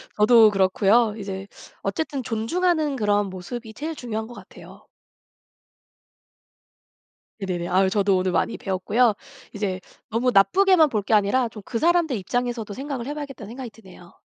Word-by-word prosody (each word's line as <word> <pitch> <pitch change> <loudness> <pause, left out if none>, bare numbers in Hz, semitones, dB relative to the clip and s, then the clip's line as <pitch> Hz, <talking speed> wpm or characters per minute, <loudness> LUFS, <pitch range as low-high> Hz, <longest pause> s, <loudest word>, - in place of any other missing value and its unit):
저도 220 +1 +6
그렇고요. 205 +3 +3
이제 195 -1 -6 0.4
어쨌든 270 +6 -3
존중하는 300 +7 0
그런 205 -3 +1
모습이 220 +6 -7
제일 315 +5 -5
중요한 220 -5 -4
것 240 - -11
같아요. - - -14 2.5
네네네. 180 -3 -3
아유. 190 +1 +3
저도 200 -1 +2
오늘 185 0 0
많이 175 +6 0
배웠고요. 210 +5 +1 0.4
이제 200 -3 -3 0.3
너무 235 +3 +1
나쁘게만 350 - +5
볼 215 -5 -1
게 220 - -1
아니라 215 +4 +2
좀 215 - -11
그 230 - -3
사람들 335 -3 +2
입장에서도 235 +1 -3
생각을 265 0 -5
해 290 - -3
봐야겠다는 280 -8 -8
생각이 250 +1 -7
드네요. 185 -5 -16
220 Hz, 345 characters per minute, -23 LUFS, 195-255 Hz, 2.5 s, 저도